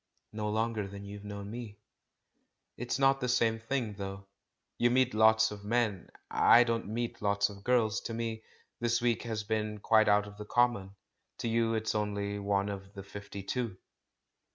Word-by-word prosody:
"No 105 0 -2
longer 110 -1 -1
than 100 +1 -9
you've 100 0 -8
known 100 0 -7
me." 115 -3 -7 1.0
"It's 120 0 -2
not 135 0 +3
the 125 - -1
same 115 -2 +2
thing, 115 -1 -2
though. 100 -1 -6 0.5
You 120 - +4
meet 130 +1 +3
lots 110 0 +5
of 105 -1 -8
men; 110 -3 0 0.2
I 120 - +7
don't 115 -2 -1
meet 115 +2 -3
lots 100 0 +2
of 100 -1 -11
girls. 115 -3 +2
To 115 - -3
me 115 -1 -3 0.4
this 120 0 +1
week 120 -2 +1
has 110 -3 -3
been 105 0 -2
quite 110 +1 +4
out 105 0 +4
of 105 0 -11
the 105 - -7
common; 105 -5 +1 0.4
to - - -3
you 115 0 +1
it's 110 0 -1
only 100 -1 -2
one 100 0 0
of 100 0 -7
the 100 - -7
fifty 100 0 -8
two." 115 -1 -3
110 Hz, 175 wpm, -31 LUFS, 100-115 Hz, 1.0 s, I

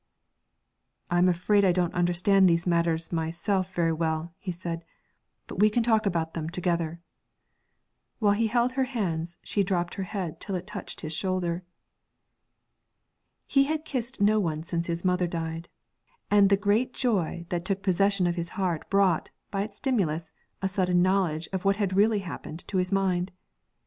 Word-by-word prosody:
'I'm 175 +1 +4
afraid 190 +4 +3
I 190 - +5
don't 175 -1 0
understand 180 +2 +4
these 170 0 +2
matters 170 -2 +1
myself 170 +3 -1
very 165 -1 +2
well,' 160 +1 -2
he 190 - -4
said; 170 -1 -5 0.6
'but - - -8
we 210 +1 +6
can 230 +2 +1
talk 220 -3 +3
about 165 -3 -1
them 160 -1 -3
together.' 170 -2 -1 1.2
While 205 -3 +3
he 225 +2 +1
held 240 +2 +2
her 265 0 0
hands, 175 -9 -2
she 205 - 0
drooped 180 -2 -1
her - - -4
head 190 -7 -4
till 195 - -3
it 180 0 -4
touched - - -7
his 155 0 -4
shoulder. 180 0 -1 1.8
He 275 0 +3
had 310 +1 -2
kissed 255 -3 -3
no 210 +2 +4
one 160 -5 -1
since 170 0 -2
his 170 +1 -3
mother 180 -1 +2
died, 165 0 -4 0.6
and 205 -1 +6
the 200 - +5
great 210 +5 +1
joy 185 -8 0
that 175 -1 -2
took 195 +1 -2
possession 195 0 +2
of 175 0 0
his 170 0 -2
heart 180 -5 -1
brought, 195 -4 +2 0.2
by 195 -1 -1
its 205 0 -5
stimulus, 170 - 0 0.3
a - - +3
sudden 180 -2 +2
knowledge 180 -4 +1
of 190 - -2
what 195 0 +3
had 195 -2 -1
really 210 +1 +4
happened 165 -1 -7
to 195 - -1
his 185 +1 0
mind. 190 -2 +1
180 Hz, 170 wpm, -27 LUFS, 170-200 Hz, 1.8 s, we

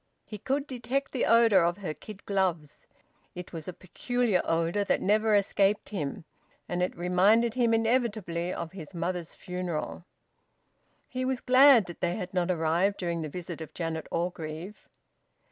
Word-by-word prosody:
He 210 - -8
could 275 +6 -1
detect 260 +1 -3
the 255 - 0
odour 230 -6 +5
of 175 +1 +1
her 180 -7 -4
kid 205 +4 -12
gloves; 175 -7 -2 0.5
it 180 0 -8
was 160 -2 -7
a - - -3
peculiar 205 +3 -1
odour 165 +5 +1
that - - +1
never 215 +2 +3
escaped 200 +1 +2
him, 160 -6 -4 0.4
and 175 0 -2
it 180 - -1
reminded 195 +7 +3
him 240 -2 +2
inevitably 225 -7 0
of 170 -2 -5
his 180 -2 -10
mother's 175 0 -3
funeral. 180 -2 -5 1.0
He 255 0 -4
was 260 -1 -1
glad 255 -4 +6
that 175 - -10
they 175 0 0
had 180 +1 -6
not 180 -1 0
arrived 175 +3 +1
during 170 -2 -2
the 155 - -4
visit 170 0 -7
of 160 - -9
Janet 165 -2 -3
Orgreave. 170 +2 -5
185 Hz, 160 wpm, -28 LUFS, 170-220 Hz, 1.0 s, glad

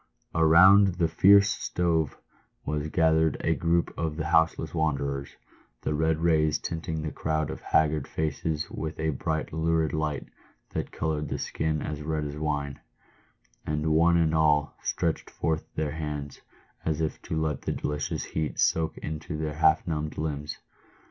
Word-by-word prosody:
Around 95 +4 +6
the 85 -2 +2
fierce 100 +5 +6
stove 80 -4 0 0.5
was 75 0 -2
gathered 80 -1 +3
a - - +2
group 85 +1 +1
of 80 -2 -2
the 80 - -2
houseless 80 -1 +2
wanderers, 70 -3 -1 0.5
the - - 0
red 80 +1 +1
rays 80 -2 +3
tinting 80 -2 -4
the 75 - -3
crowd 80 +1 -1
of - - -7
haggard 75 -2 +1
faces 80 0 -2
with 80 0 -5
a 80 0 +1
bright 80 +3 -3
lurid 80 0 +1
light 75 -2 -2 0.5
that - - -3
coloured 75 -1 -2
the - - -2
skin 80 -1 -2
as 75 -1 -4
red 75 0 -2
as 75 0 -5
wine; 75 -2 -2 0.8
and 75 +1 0
one 85 +2 +4
and 80 -2 +2
all 75 -2 +2
stretched 80 -2 -1
forth 80 -1 -2
their 75 -2 -1
hands, 75 -2 -5 0.4
as 80 -1 -1
if 80 -2 -2
to 80 - -3
let 80 -1 -1
the - - -2
delicious 75 0 -2
heat 80 -1 -3
soak 80 -1 +2
into 75 +1 -5
their 75 -1 -3
half 80 +1 +3
numbed 75 -2 -3
limbs. 75 -1 -3
80 Hz, 155 wpm, -27 LUFS, 75-80 Hz, 0.8 s, Around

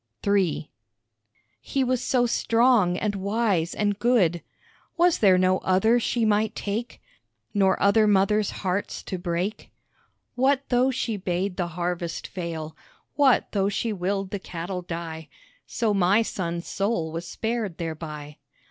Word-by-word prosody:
III 195 -7 +1 0.9
He 275 - -1
was 255 -1 0
so 245 -2 +2
strong 230 -6 +3
and 210 +1 -1
wise 200 -3 0
and 205 -1 0
good 195 -9 +2 0.6
Was 350 0 +3
there 190 -4 +5
no 185 0 +3
other 220 +6 +3
she 235 0 0
might 215 0 +1
take, 215 +4 -4 0.5
Nor 195 -2 +3
other 215 +2 +4
mothers' 205 +1 +3 0.2
hearts 185 +2 -2
to 185 - -5
break? 175 +4 -3 0.6
What 270 +2 +1
though 250 +1 +3
she 230 -4 -2
bade 185 0 -2
the 180 -2 -1
harvest 175 -1 -3
fail, 165 -4 -5 0.4
What 275 -4 +3
though 200 -1 +1
she 220 +2 -2
willed 195 +1 -2
the 205 - -3
cattle 180 0 -5
die, 165 -3 -6 0.4
So 225 -3 0
my 195 +3 +3
son's 170 -5 -4
soul 195 -6 -1
was 165 +2 -5
spared 220 -1 -3
thereby. 155 -3 -6
195 Hz, 140 wpm, -25 LUFS, 175-225 Hz, 0.9 s, there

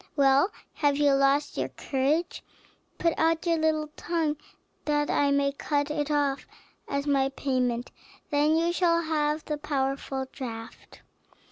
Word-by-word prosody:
Well, 275 +4 +4 0.2
have 285 -2 +1
you 290 -1 +4
lost 275 +1 +2
your - - -1
courage? 295 +6 -1 0.5
Put 335 -1 +2
out 325 +1 +2
your 335 -1 +2
little 310 -1 +1
tongue 325 -3 -1 0.5
that 295 -1 +1
I 285 - +2
may 280 0 +2
cut 290 +1 -1
it 295 -1 -2
off 285 -2 0 0.4
as 280 0 -2
my 275 -2 +2
payment; 255 -3 -1 0.4
then 295 +2 +3
you 335 +1 +1
shall 335 -1 +2
have 305 -1 0
the 300 -1 -3
powerful 270 -2 -2
draught." 225 -3 -9
290 Hz, 140 wpm, -27 LUFS, 275-310 Hz, 0.5 s, Well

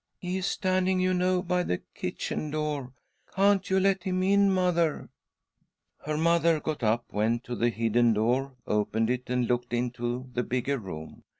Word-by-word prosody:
"He 180 +1 -3
is 190 - -2
standing, 185 -1 +1
you 185 0 +2
know, 180 0 +1
by 180 +1 +1
the 90 - -2
kitchen 155 - -4
door. 150 -4 -3 0.4
Can't 195 0 +3
you 190 0 +3
let 195 0 +2
him 185 -1 -1
in, 200 +1 +4
mother? 175 -4 +1 0.5
" - - -49
Her 150 0 -1
mother 170 0 +3
got 155 -2 -4
up, 115 +1 +1
went 115 +3 +1
to 120 - -5
.the 120 +1 +2
hidden 115 +1 +2
door, 125 +5 0
opened 110 +2 0
it, 125 0 -3
and 125 -1 +1
looked 120 0 -1
into, 120 +1 -2
the 125 - 0
bigger 130 +3 -1
room. 80 -7 -8
140 Hz, 175 wpm, -28 LUFS, 120-185 Hz, 0.5 s, in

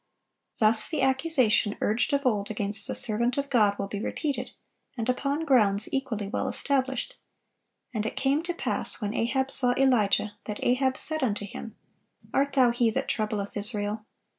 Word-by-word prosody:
Thus 215 0 +3
the 300 -5 -1
accusation 265 -6 +1
urged 225 +8 0
of 280 0 0
old 210 -5 0
against 205 0 +1
the - - -3
servant 235 +1 +2
of 280 0 -3
God 210 -5 +3
will 200 - -3
be 200 0 -5
repeated, 285 +4 -3 0.5
and 230 0 -3
upon 280 +5 -1
grounds 215 -7 +3
equally 240 -7 -3
well 200 - -3
established: 265 - -2 0.8
"And 215 -3 -2
it - - -6
came 275 +3 +1
to 350 - -2
pass, - - +2
when 210 -3 -3
Ahab 265 +4 -1
saw 250 -3 +4
Elijah, 215 -5 +1
that 210 -1 -5
Ahab 260 +1 +1
said 315 0 +1
unto 205 -5 -1
him, 215 +2 -9 0.6
Art 280 0 +1
thou 255 -3 +4
he 235 -1 +1
that 220 - -3
troubleth 210 -2 -3
Israel? 210 +1 0
235 Hz, 165 wpm, -26 LUFS, 210-270 Hz, 0.8 s, saw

